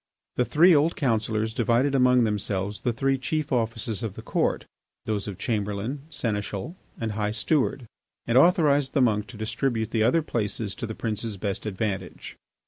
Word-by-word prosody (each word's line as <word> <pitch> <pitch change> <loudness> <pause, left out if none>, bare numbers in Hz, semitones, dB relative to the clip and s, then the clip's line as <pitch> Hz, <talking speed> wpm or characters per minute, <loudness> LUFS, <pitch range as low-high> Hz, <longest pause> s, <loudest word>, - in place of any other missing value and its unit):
The 125 - +2
three 170 +7 +5
old 155 +3 +3
councillors 110 -4 0
divided 120 +3 +2
among 125 -2 +5
themselves 105 -2 -2
the 125 - +1
three 135 +3 0
chief 155 +3 -2
offices 115 -3 -1
of 110 -5 -4
the - - -9
Court, - - 0 0.4
those 105 -2 -2
of 100 -3 -5
Chamberlain, 110 +7 -3
Seneschal, 105 - -3 0.2
and 115 -1 -2
High 105 0 -1
Steward, 130 +4 0 0.4
and 115 - 0
authorised 145 -3 +4
the 140 - +3
monk 105 -3 +1
to 125 - -11
distribute 110 +1 -1
the 110 - +1
other 130 +9 +3
places 105 -5 -2
to 120 - -5
the 110 - -6
prince's 110 -1 -3
best 100 +2 -3
advantage. 95 -2 -4
115 Hz, 165 wpm, -26 LUFS, 105-135 Hz, 0.4 s, three